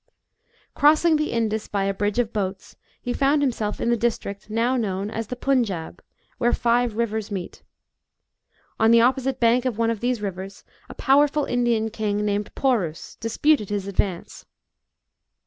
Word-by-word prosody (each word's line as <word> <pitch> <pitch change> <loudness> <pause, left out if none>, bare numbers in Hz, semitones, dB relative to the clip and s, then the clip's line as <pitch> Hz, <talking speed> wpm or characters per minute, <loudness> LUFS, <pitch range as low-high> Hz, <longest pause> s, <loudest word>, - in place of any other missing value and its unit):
Crossing 310 +2 +4
the 305 0 -1
Indus 220 -2 -1
by 200 -1 -1
a 195 0 0
bridge 205 +2 -1
of 235 -2 0
boats, 190 -2 -4 0.2
he 245 - -3
found 285 +2 +2
himself 225 -6 -1
in 235 - 0
the - - +4
district, 220 -3 -3
now 230 +4 +1
known 205 -3 -2
as 225 -1 -4
the 250 - -5
Punjab, 230 -12 -1 0.4
where 240 -1 +2
five 240 -1 +1
rivers 220 -2 -2
meet. 190 -4 -6 1.2
On 220 - +4
the 230 0 +6
opposite 260 +1 +1
bank 240 +1 +3
of 250 -5 -2
one 230 0 +1
of 225 - -3
these 245 0 -1
rivers 195 -1 -6 0.3
a - - -9
powerful 290 +2 +3
Indian 235 -3 0
king, 210 -1 -1
named 205 0 -2
Porus, 200 - -1
disputed 230 +1 +1
his 205 -2 -2
advance. 190 -2 -3
230 Hz, 160 wpm, -23 LUFS, 205-245 Hz, 1.2 s, the